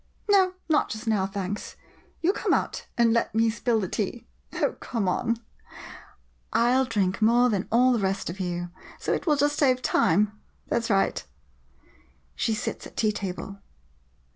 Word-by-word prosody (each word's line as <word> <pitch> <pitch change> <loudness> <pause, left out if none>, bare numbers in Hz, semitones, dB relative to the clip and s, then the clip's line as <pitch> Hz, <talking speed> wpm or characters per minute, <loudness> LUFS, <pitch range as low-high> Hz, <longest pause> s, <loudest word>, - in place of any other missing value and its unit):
'] - - -27
No, 380 -2 +5
not 310 -2 +2
just 220 +2 -6
now, 210 -4 +1
thanks. 195 0 -5 0.5
You 360 +4 +3
come - - +1
out - - -3
and 235 -1 +4
let 230 -1 0
me 225 0 +3
spill 230 0 0
the 190 - -2
tea. 215 +5 -3 0.3
Oh, - - +1
come 225 -6 -2
on 230 +5 0 0.6
— - - -21
I 235 +1 +3
'11 260 0 +2
drink 200 -3 0
more 240 +3 +4
than 195 -3 -1
all 250 +3 +5
the 235 - +1
rest 195 0 -1
of 175 +4 -5
you 175 -1 -3
— - - -18
so - - -1
it - - -3
will 300 - +4
just 290 +1 +1
save 255 -3 +3
time. 210 +1 +3 0.4
That 235 - 0
's - - -4
right. 195 -2 +1 1.1
[She 225 -2 0
sits 225 - -4
at - - -19
tea 215 -2 +2
table. 200 -1 -5
225 Hz, 185 wpm, -26 LUFS, 195-245 Hz, 1.1 s, No